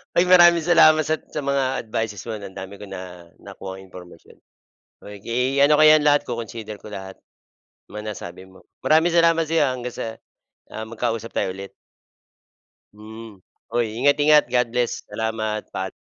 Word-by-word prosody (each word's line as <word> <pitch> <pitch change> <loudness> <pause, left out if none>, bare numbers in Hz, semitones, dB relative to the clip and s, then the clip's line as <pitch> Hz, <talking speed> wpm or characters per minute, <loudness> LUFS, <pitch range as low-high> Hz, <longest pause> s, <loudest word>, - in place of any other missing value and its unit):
Ay, 175 - +5
maraming 175 -2 +6
salamat 155 -2 +5
sat 155 +1 -2
sa 150 - -4
mga 135 -2 -1
advices 110 -2 -4
mo, 115 -2 -4
'no, 100 -1 -8
ang 95 - -16
dami 95 +1 -8
ko 105 - -9
na 90 -2 -10
nakuhang 95 0 -9
impormasyon. 90 -2 -14 0.7
Oh, 105 - -10
ke 125 +4 0
ano 150 +1 +5
ko 155 - +6
yan 155 -1 +6
lahat 145 -1 +3
co-consider 115 -2 -6
ko 105 - -11
lahat, 95 -1 -8 0.7
mga 105 +1 -6
nasabi 90 +1 -10
mo. 95 - -20 0.2
Maraming 160 +2 +3
salamat 165 -1 +4
sa 165 - -2
'yo, 160 - +3
ah, 130 - 0
hanggang 125 -1 -6
sa - - -5 0.7
ah, 110 - -5
magkausap 115 -1 -4
tayo 95 - -1
ulit. 100 0 -9 1.2
Mm, 110 -1 -12 0.3
hoy, 120 0 0 0.2
ingat-ingat. 145 +1 +4
God 125 -1 +2
bless, 120 -1 -2
salamat, 110 -1 -4
paa 95 - -4
115 Hz, 170 wpm, -22 LUFS, 105-150 Hz, 1.2 s, maraming